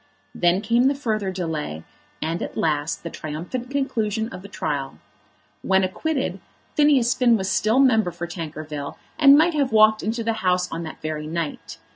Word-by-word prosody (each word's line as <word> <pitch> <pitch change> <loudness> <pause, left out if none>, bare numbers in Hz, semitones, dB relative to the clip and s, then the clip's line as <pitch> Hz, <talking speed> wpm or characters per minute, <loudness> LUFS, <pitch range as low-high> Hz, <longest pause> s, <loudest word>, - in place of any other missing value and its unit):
Then 175 +2 +2
came 235 +4 +3
the 280 - +2
further 215 -8 -1
delay, 160 - -4 0.4
and 165 +2 -2
at - - -5
last 150 -1 -1
the 170 - -5
triumphant 175 +12 -5
conclusion 230 -6 -1
of 180 - -9
the 200 - -10
trial. 145 -8 -3 0.6
When 190 0 +2
acquitted, 275 +9 -2 0.3
Phineas 280 -5 +4
Finn 240 -3 +4
was 190 -1 -2
still 215 +5 +2
member 225 -8 +4
for 175 0 -6
Tankerville 155 -4 -6 0.2
and 280 -2 +8
might 335 +3 +4
have 280 -3 +1
walked 215 0 +5
into 230 +2 -2
the 225 0 0
House 180 -1 +2
on 165 - -4
that 160 -2 -8
very 155 -1 -3
night. 165 -1 -4
195 Hz, 170 wpm, -23 LUFS, 165-240 Hz, 0.6 s, and